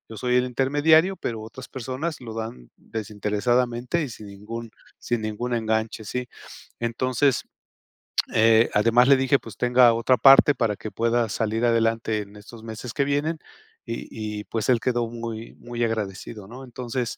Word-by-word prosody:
soy 125 +3 0
el 125 - +2
intermediario, 145 +8 +3
pero 115 -2 -4
otras 120 +4 -10
personas 130 +6 -4
lo 115 -3 -7
dan 110 - -7
desinteresadamente 120 +7 -1
y 140 - -4
sin 110 -3 -10
ningún 110 +3 -8 0.3
sin 120 -2 -2
ningún 110 +3 -3
enganche". 110 -1 -1
Sí. 125 +4 -4 0.5
Entonces, 130 +3 +1 0.9
eh, 115 +1 +5
además, 115 +4 +4
le 140 - +8
dije: 135 +1 +3
"Pues 110 -3 -11
tenga 125 0 +5
otra 115 +2 +2
parte 135 +2 +7
para 115 -4 0
que 110 - -7
pueda 115 0 +1
salir 110 +3 -1
adelante 115 -1 +1
en 100 0 -11
estos 110 +2 -13
meses 115 +2 -7
que 140 - +1
vienen", 145 +3 -1 0.5
y 110 -2 -5
y - - -10
pues 110 0 -3
él 125 -2 +4
quedó 120 -1 0
muy 115 -1 -7
muy 120 0 -4
agradecido, 105 -2 -4
¿no? 125 +5 -10
Entonces 125 -1 -4
115 Hz, 155 wpm, -24 LUFS, 110-125 Hz, 0.9 s, le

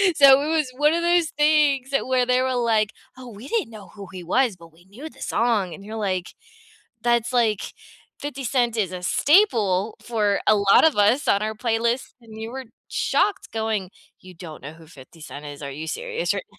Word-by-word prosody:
so, 275 -1 +7
it - - -3
was 310 -5 0
one 300 +2 +3
of 340 - 0
those 345 -1 +2
things 295 -3 +2
that 275 - 0
where 255 -1 +2
they 250 +1 +2
were 260 -1 0
like, 220 -3 +1 0.3
"Oh, 255 -1 -10
we 225 +3 -11
didn't 425 - -1
know 210 -3 -12
who 200 -2 -11
he 185 -2 -8
was, 235 +3 +1
but 170 -1 -15
we 175 +2 -23
knew 255 +12 -10
the - - -19
song." 215 -6 0
And 195 - -11
you're 220 +1 -7
like, 185 -4 -2 0.7
"That's, 235 0 +1
like 225 -4 0 0.5
50 280 -2 -6
Cent 240 -2 0
is 190 -4 0
a 180 -1 -7
staple 215 - +2
for 210 -4 0
a 215 - +6
lot 200 -1 +4
of 315 - +2
us 215 +8 +3
on 200 - +3
our 220 0 -2
playlist," 235 +2 -1
and 220 -1 -13
you 225 - -5
were 265 0 -7 0.2
shocked 410 - 0
going, 220 -4 -2 0.3
"You 185 0 -13
don't 165 -3 -10
know 150 +3 -8
who 165 -1 -17
50 155 +1 -16
Cent 145 0 -9
is? 145 0 -9
Are 140 - -5
you 155 +4 -7
serious 485 - -2
right - - -5
225 Hz, 210 wpm, -23 LUFS, 195-265 Hz, 0.7 s, so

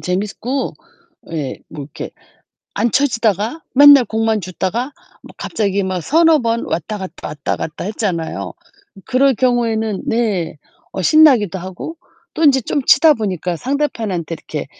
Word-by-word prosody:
재밌고 210 +8 -2 0.6
예 145 -5 -4
뭐 150 -2 -8
이렇게 140 - -8 0.6
안 230 +3 +1
쳐지다가 230 - 0
맨날 285 -1 +8
공만 220 -1 0
줍다가 205 - -3 0.3
뭐 - - -14
갑자기 200 - -1
막 185 -2 -2
3-4 320 - +4
번 230 0 -1
왔다갔다, 190 +3 -5
왔다갔다 150 +1 -4
했잖아요. 185 -6 -3 0.5
그럴 265 +1 +3
경우에는 225 -4 0
네. 200 -9 -1 0.4
어 - - -4
신나기도 235 - +5
하고 190 - -7 0.4
또 325 - -3
인제 270 -2 +5
좀 285 - -1
치다 305 +4 +6
보니까 185 - -3
상대편한테 225 - -2
이렇게 150 -2 -6
220 Hz, 280 characters per minute, -18 LUFS, 185-260 Hz, 0.6 s, 맨날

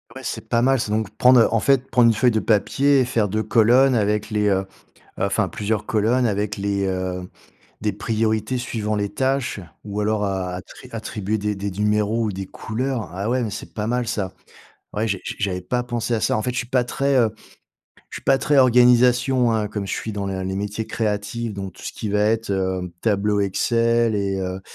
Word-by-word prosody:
Ouais, - - -8
c'est - - -5
pas 115 - +2
mal, 135 +1 +3
c'est 110 - -2
donc 110 -1 0
prendre, 125 -1 +6
heu, - - +5
en 115 - +3
fait, 135 +1 +2
prendre 120 -2 +5
une 115 - +5
feuille 125 +3 +3
de 110 - +1
papier 135 +7 +2
et - - +2
faire 115 -4 0
2 110 +3 -1
colonnes 120 +5 +4
avec 105 -2 0
les, 105 -1 +1
heu, 95 -1 +1 0.5
enfin - - +1
plusieurs 105 0 -2
colonnes 120 +1 +2
avec 105 0 -1
les, 100 0 -1
heu, 95 -1 -3 0.5
des 105 -1 0
priorités 110 +3 -1
suivant 110 -3 -2
les 100 0 -1
tâches 130 -4 -1 0.2
ou 105 0 -3
alors 105 0 0
a 95 -2 -2
attri 95 +7 -11
attribuer 110 -2 -3
des 105 0 -2
des 100 +1 -4
numéros 105 +3 +1
ou 105 - -1
des 95 0 -5
couleurs, 125 +3 -3
ah 100 +4 -3
ouais, 125 +1 +1
mais 110 - -2
c'est - - -8
pas 105 0 -3
mal 120 0 -1
ça. 100 -5 -2 0.6
Ouais, 110 +2 -1
j'ai 100 -3 -1
j'ai - - -4
j'avais 95 -3 -1
pas 125 +7 -1
pensé 120 -1 -2
à 110 - -2
ça, - - +1
en - - -1
fait, 125 - -1
je - - -4
suis 125 - -2
pas 125 0 +2
très, 140 +3 0
heu, 115 -3 +3 0.8
je - - -7
suis - - -16
pas 135 - +4
très 145 +1 +2
organisation, 125 0 +4
hein. 110 -2 0
Comme 100 -1 -4
je - - -4
suis 110 - -3
dans 100 -1 -3
le 95 -1 -3
les 95 +1 -3
métiers 105 +2 -3
créatifs, 105 +1 -2
donc 95 -2 -6
tout - - -15
ce - - -4
qui 110 - -5
va 105 +1 +1
être, 110 +1 +1
heu, 95 -2 -1
tableau 105 -1 +1
Excel 115 +3 +1
et 100 -1 -1
heu, 95 0 -4
110 Hz, 220 wpm, -22 LUFS, 100-120 Hz, 0.8 s, prendre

